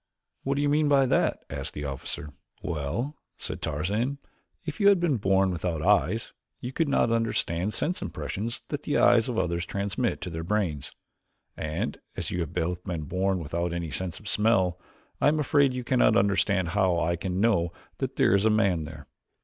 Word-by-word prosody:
"What 140 +1 -1
do 145 - 0
you 145 - +2
mean 150 0 +3
by 140 -2 +5
that?" - - +1
asked - - -5
the 75 - -4
officer. 70 +2 -5 0.3
"Well," 90 - -3 0.2
said - - -5
Tarzan, 100 - -1 0.5
"if 155 - -5
you 200 - +5
had 200 -2 +6
been 165 -7 +2
born 95 -2 +3
without 85 -2 -2
eyes - - +2 0.3
you 125 +2 -6
could 165 +2 +1
not 120 -4 +3
understand 105 -4 0
sense 180 +3 -1
impressions 115 +4 -4
that - - -3
the - - 0
eyes - - +5
of - - -2
others 85 0 0
transmit 100 +6 -1
to 90 - -5
their 80 0 -4
brains, 85 -7 -1 0.6
and 75 0 -3 0.2
as - - -3
you 90 - -2
have 80 -4 -2
both 90 +1 -2
been 85 -5 -3
born 95 +5 0
without 85 +1 -2
any 85 -2 -3
sense 90 +3 -3
of 105 - -12
smell 100 -4 +2 0.4
I - - +5
am 155 +1 +3
afraid 140 -2 +3
you 125 - -3
cannot 125 +1 +4
understand 95 -2 +2
how 95 -2 +2
I 85 +1 +1
can 90 +2 -3
know 100 -6 +2 0.3
that - - -2
there - - +4
is 100 0 +4
a 110 - +4
man 100 -7 +2
there." 75 -2 -10
95 Hz, 190 wpm, -27 LUFS, 85-120 Hz, 0.6 s, had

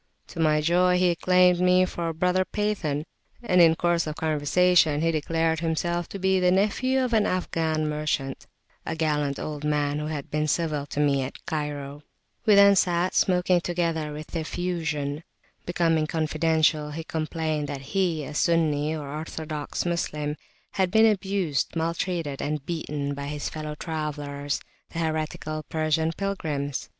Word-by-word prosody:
To - - -9
my 155 -1 +3
joy 180 +3 +3
he 180 -1 +3
claimed 180 +1 +4
me 180 0 +4
for 170 -2 -4
a 165 - -2
brother 180 +3 +2
Pathan, 185 -8 -2 0.4
and 180 -6 +4
in 165 -1 +6
course 170 -1 +1
of 155 - -4
conversation 160 +1 +3
he 165 0 +2
declared 160 +1 0
himself 170 +1 -1
to - - -6
be 190 0 +2
the 180 0 +3
nephew 230 +8 +2
of 245 - -3
an 215 -2 +3
Afghan 160 -4 -1
merchant, 150 -3 -2 0.4
a - - -3
gallant 150 -3 0
old 150 -1 -5
man 150 -1 0
who 150 - -3
had 150 -3 -5
been 150 0 0
civil 150 -3 -1
to 145 - -5
me 140 -2 +3
at 130 +1 -7
Cairo. 145 -2 -4 0.5
We 210 - +7
then 200 0 +7
sat 180 -1 +2
smoking 180 -1 +3
together 165 -3 -1
with 155 +3 -8
"effusion." 155 -3 -2 0.4
Becoming 165 -3 +1
confidential, 155 -1 +1
he 160 +2 -5
complained 155 -1 -2
that 140 -1 -5
he, 175 -6 +1
a 150 - -7
Sunni, 155 -1 +1
or 150 -2 -6
orthodox 155 +1 -4
Moslem, 150 -4 -2 0.4
had 190 -2 +1
been 220 +3 +5
abused, 195 -9 0
maltreated, 165 -3 -2
and 150 -1 -3
beaten 150 -4 -3
by 140 0 -5
his 145 0 -4
fellow 155 -1 -5
travellers, 145 -3 -4 0.3
the - - -9
heretical 155 -1 -2
Persian 160 0 +1
pilgrims. 155 -8 -3
160 Hz, 155 wpm, -26 LUFS, 150-175 Hz, 0.5 s, We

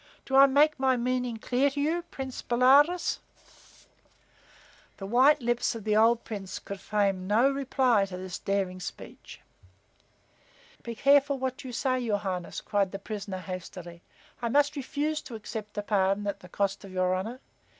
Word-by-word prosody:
Do 265 - -2
I 275 +1 +9
make 290 +2 +3
my 260 -1 +2
meaning 250 -1 -1
clear 255 +5 +1
to 285 +1 -5
you, 320 +4 0
Prince 265 -1 -6
Bolaroz?" 275 +8 +4 1.8
The 195 - -7
white 260 +6 +4
lips 240 0 0
of 225 - -7
the 210 0 +1
old 230 +2 +4
Prince 200 -4 -6
could 200 -1 -8
frame 195 -3 0
no 235 +7 +4
reply 260 -6 +2
to 180 -1 -7
this 185 -1 -6
daring 195 -2 -2
speech. 180 - -9 1.4
"Be 235 - -6
careful 280 +2 +4
whet 260 +1 -4
you 260 - -7
say, 255 +1 0
your 225 -4 0
Highness," 185 -4 -4
cried 200 -3 0
the 195 - -4
prisoner, 200 -1 -6
hastily. 180 -1 -8 0.4
"I 235 - -1
must 290 +4 +2
refuse 295 +3 -2
to 240 - -9
accept 215 -1 -7
a 205 - -1
pardon 200 0 +1
at 200 - -3
the 180 - -14
cost 200 +2 -1
of 195 - -10
your 185 0 +1
honor. 220 +7 -4
230 Hz, 165 wpm, -28 LUFS, 195-265 Hz, 1.8 s, I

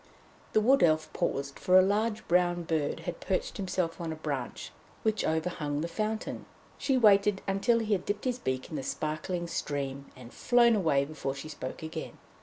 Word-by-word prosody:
The 215 - +4
Wood 265 +5 +4
Elf 155 -2 +3
paused, 140 0 -2
for 185 0 +5
a 185 - +8
large 210 +3 0
brown 175 0 +2
bird 160 -1 -1
had 170 0 -5
perched 190 - -2
himself 180 -3 -2
on 165 -1 -3
a - - -4
branch 140 -6 -4 0.3
which 220 -1 +1
overhung 155 -2 -1
the 165 - -1
fountain. 215 +5 -3 0.3
She 270 -2 +2
waited 205 -3 +4
until 195 +5 +2
he 220 -2 0
had 185 -2 0
dipped 205 +4 -3
his 250 -1 0
beak 130 - -3
in 155 - -3
the - - -2
sparkling 155 +6 -3
stream 140 -4 -3
and 125 -1 -12
flown 240 -1 +4
away 155 -8 +2
before 140 -2 -4
she 140 +3 -7
spoke 135 -1 -6
again. 160 - -6
175 Hz, 185 wpm, -30 LUFS, 150-210 Hz, 0.3 s, a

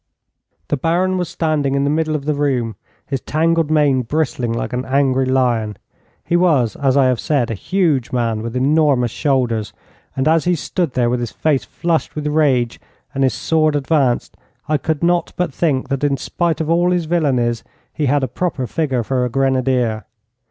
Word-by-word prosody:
The 145 - +1
Baron 180 +6 +1
was 175 -2 -2
standing 155 -5 0
in 140 - +1
the 140 - +1
middle 155 0 0
of 140 -2 -4
the 150 - +1
room, 130 -6 -1 0.3
his 135 -2 -3
tangled 165 0 +1
mane 145 -4 +3
bristling 125 -2 -1
like 115 - -3
an 125 +1 -1
angry 135 -1 +1
lion. 120 -5 +1 0.5
He 170 - 0
was, 155 -10 +2
as 135 -1 +1
I 135 - +5
have 130 -2 +1
said, 135 -7 0
a - - -1
huge 150 - 0
man 115 -3 -1
with 115 +1 -5
enormous 135 -3 +2
shoulders; 125 -8 0 0.4
and 135 +2 0
as 160 -1 +3
he 180 0 +2
stood 170 -1 -2
there, 125 -2 +1
with 125 +1 0
his 120 -1 -3
face 150 -4 0
flushed 170 -2 -2
with 150 -1 -4
rage 140 -6 +1 0.3
and 135 - 0
his 130 - +2
sword 155 -2 +1
advanced, 140 -3 0 0.3
I 155 0 +2
could 160 -1 -2
not 175 -1 +1
but 180 -5 -1
think 140 -5 0
that, 135 0 -2
in 140 -1 +2
spite 170 +5 -1
of 160 - -2
all 170 +2 +2
his 180 -2 0
villainies, 130 -8 0 0.3
he 150 -3 -1
had 140 +1 +2
a - - +1
proper 145 -2 -2
figure 135 -3 -1
for 125 +2 -1
a 125 - 0
grenadier. 130 -3 0
140 Hz, 190 wpm, -18 LUFS, 125-160 Hz, 0.5 s, I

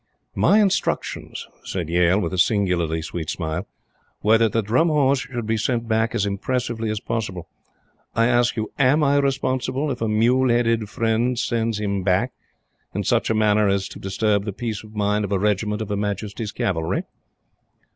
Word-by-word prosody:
"My 210 - +4
instructions," 200 -3 -1 0.2
said 90 -4 -4
Yale, 90 +3 +3
with 85 -3 -2
a 90 - -1
singularly 90 -6 +1
sweet 80 -1 -5
smile, 80 -3 -3 0.6
"were 110 +2 +5
that 115 -2 +3
the 115 - +1
Drum 120 +11 +2
Horse 140 -3 +3
should 125 -3 -5
be 110 +1 0
sent 115 +1 -1
back 110 0 +1
as 100 - +1
impressively 115 +2 -2
as 105 -1 -2
possible. 95 -7 -4 0.7
I 115 +1 +3
ask 120 0 +2
you, 110 - -3
AM 140 +3 +4
I 140 0 +3
responsible 135 0 0
if 125 - -5
a 115 - +1
mule 120 +4 +3
headed 115 -3 +1
friend 115 +2 0
sends 115 -2 -1
him 100 -2 -1
back 95 +7 +1 0.6
in - - -1
such - - +1
a 110 - +2
manner 105 -1 +3
as 100 -1 0
to - - -10
disturb 100 +1 0
the 105 - -3
peace 110 0 -4
of 110 0 -14
mind 105 0 +1
of 100 - -4
a 100 - +2
regiment 105 +2 0
of 110 - -9
Her 105 - -1
Majesty's 105 +1 -3
Cavalry?" 80 -4 -1
110 Hz, 180 wpm, -22 LUFS, 100-120 Hz, 0.7 s, were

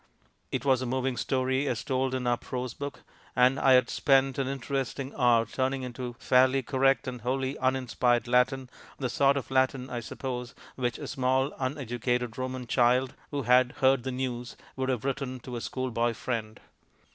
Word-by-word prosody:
It - - -2
was 130 -2 +3
a 130 - -2
moving 130 +1 -1
story 130 +3 0
as 115 -4 -1
told 130 -1 0
in 130 -1 -3
our 120 0 +3
prose 125 0 -5
book, 140 0 -7 0.3
and 130 +2 +4
I 135 - +5
had 130 0 +5
spent 135 -1 +2
an 135 - 0
interesting 135 0 -3
hour 120 -3 +4
turning 130 +3 -1
into 125 -1 -5
fairly 130 +1 +3
correct 135 +1 +2
and 125 -2 -5
wholly 130 +3 -1
uninspired 125 -2 +1
Latin 125 +2 +2 0.3
the 130 -3 -2
sort 140 +2 +3
of 135 - -5
Latin 130 0 +1
I 120 - -2
suppose 125 +1 -5 0.2
which 120 -2 -1
a - - -7
small 130 +1 +1
uneducated 125 -3 -2
Roman 130 0 -3
child 125 +2 +2 0.2
(who 145 -2 -3
had 125 +1 +4
heard 135 -2 +3
the 130 - -3
news) 125 -1 -4 0.2
would 130 0 -2
have 125 -2 -1
written 135 -1 -2
to 125 0 -7
a 120 - -4
school 130 +1 -3
boy 115 0 0
friend. 110 -3 -4
130 Hz, 180 wpm, -28 LUFS, 125-135 Hz, 0.3 s, I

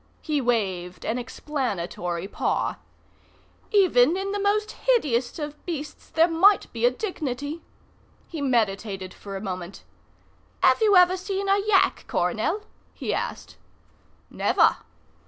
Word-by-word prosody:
He 300 -3 0
waved 190 -7 -1
an 235 +3 -1
explanatory 190 - -3
paw. - - -1 0.9
"Even 350 - +4
in 390 +1 -3
the 410 - -2
most 420 +1 +1
hideous 290 - 0
of 295 -1 -6
beasts 300 -4 -6
there 325 +1 +4
might 375 +5 +4
be 235 +1 +2
a - - +6
dignity." 290 - -4 0.7
He 320 -4 -6
meditated 200 -7 -1
for 200 -1 -9
a - - -7
moment. 185 -2 -6 0.8
"Have - - +5
you 420 -2 +5
ever 360 0 +6
seen 390 +1 -3
a 395 +1 +4
yak, 400 -1 +2
Coronel?" 420 - -1 0.3
he - - -3
asked. - - -4 0.7
"Never." - - +3
290 Hz, 125 wpm, -25 LUFS, -, 0.9 s, a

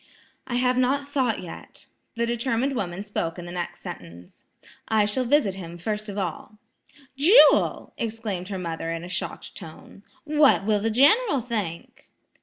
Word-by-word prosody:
"I 245 - -3
have 250 0 +2
not 275 +2 +1
thought 255 -8 0
yet." 170 - -11 0.3
The 235 0 0
determined 240 +3 -1
woman 190 -3 -3
spoke 180 -5 -3
in 175 - -7
the 175 - -8
next 175 -1 -5
sentence, 85 +1 -11 0.4
"I 220 -2 +3
shall 230 +5 0
visit 265 -6 +3
him 175 -3 -8
first 210 +4 -4
of 200 - -6
all." 190 +2 -4 0.6
"Jewel!" 335 - +5
exclaimed 215 -5 -3
her 195 -1 -4
mother 165 -2 -4
in 165 0 -4
a - - -7
shocked 180 - -5
tone. 165 +3 -12 0.2
"What 295 -8 +4
will 210 -1 +2
the 225 +2 0
General 285 - +4
think?" 210 -9 -5
215 Hz, 160 wpm, -25 LUFS, 180-255 Hz, 0.6 s, Jewel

